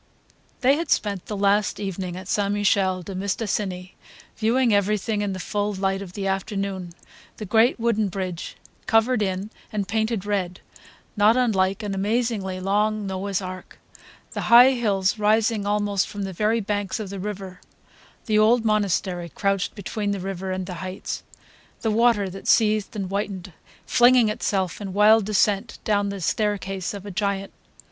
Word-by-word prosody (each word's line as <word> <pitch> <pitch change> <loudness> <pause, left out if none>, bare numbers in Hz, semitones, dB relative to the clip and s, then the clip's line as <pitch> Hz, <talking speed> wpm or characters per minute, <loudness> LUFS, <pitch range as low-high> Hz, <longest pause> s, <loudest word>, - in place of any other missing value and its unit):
They 270 +2 +4
had 335 - -3
spent 200 -4 0
the 210 - -4
last 200 +1 +2
evening 185 -3 -4
at 185 - -9
St. 200 -1 0
Michel 195 -3 +1
de 195 - -7
Mistassini 190 -1 -3 0.4
viewing 230 +1 +2
everything 205 +1 +1
in 205 -2 -1
the - - -5
full 205 +2 -2
light 195 0 -1
of 185 -3 -9
the 195 0 -4
afternoon: 195 -2 -3 0.4
the 215 - -6
great 225 +5 +3
wooden 225 -2 +1
bridge, 185 -2 -5 0.3
covered 225 +1 +3
in 195 +1 -2 0.2
and 205 -2 -2
painted 220 0 -1
red, 190 -4 -2 0.6
not 215 +3 +4
unlike 195 -4 +1
an 205 -1 -3
amazingly 205 -2 -1
long 210 +2 0
Noah's 195 0 -2
ark; 185 0 -8 0.5
the - - -4
high 245 +3 +9
hills 210 -4 0
rising 215 0 +2
almost 205 -1 +1
from 205 -1 -5
the 190 -1 -4
very 215 +5 +1
banks 205 +1 -2
of 205 -3 -5
the 200 - -5
river, 190 -2 -6 0.6
the 215 -2 +2
old 225 +2 +4
monastery 190 -4 0
crouched 195 +2 -1
between 205 +1 -3
the 200 -1 -1
river 190 0 -4
and 185 0 -3
the 180 - -6
heights, 185 0 -5 0.6
the 220 - 0
water 225 -2 +3
that 190 +1 -9
seethed 215 -1 +3
and 195 -3 -3
whitened, 195 -2 -4 0.3
flinging 245 -2 +5
itself 200 -4 -1
in 195 -2 -5
wild 210 +1 +5
descent 210 +1 +1
down 205 -1 +1
the 200 0 -5
staircase 195 0 -1
of 200 0 -8
a 205 - -6
giant. 195 0 -2
200 Hz, 160 wpm, -24 LUFS, 190-215 Hz, 0.6 s, high